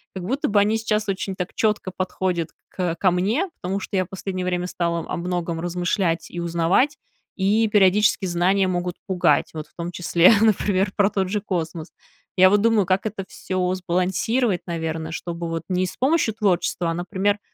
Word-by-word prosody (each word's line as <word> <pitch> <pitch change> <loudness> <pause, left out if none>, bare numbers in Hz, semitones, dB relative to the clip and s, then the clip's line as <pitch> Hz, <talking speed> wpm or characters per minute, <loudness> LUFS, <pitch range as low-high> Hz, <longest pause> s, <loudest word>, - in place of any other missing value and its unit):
как 185 - -5
будто 265 +6 -1
бы 205 - +4
они 210 +2 +2
сейчас 215 -1 -1
очень 190 0 -2
так 180 -1 -5
чётко 210 -3 0
подходят 185 -3 -2 0.2
кэ 180 -3 -2
ко 185 - +4
мне, 215 - 0
потому 190 +2 -2
что 195 0 -4
я 185 - +1
в - - -22
последнее 190 -1 -4
время 180 0 -1
стала 170 -2 -1
об 165 - -4
многом 175 -2 -2
размышлять 175 0 -1
и 175 - -6
узнавать, 170 - +1 0.4
и 205 +4 +2
периодически 210 0 +3
знания 185 +3 +2
могут 180 -1 -1
пугать, 185 -2 +2
вот 155 -1 -5
в - - -33
том 170 0 -5
числе, 175 +1 +4
например, 200 -3 +2
про 200 -1 +3
тот 190 -3 -1
же 210 +1 -1
космос. 165 -5 -4 0.5
Я 185 0 +7
вот 205 0 +4
думаю, 225 -3 +3
как 185 +3 +1
это 200 -2 -5
всё 185 -1 -2
сбалансировать, 185 +4 0
наверно, 160 -1 -3
чтобы 170 0 -5
вот 165 0 -3
не 185 0 +1
с - - -9
помощью 265 -5 +2
творчества, 185 -4 0
а, - - -1
например, 190 +4 -1
185 Hz, 185 wpm, -23 LUFS, 175-205 Hz, 0.5 s, Я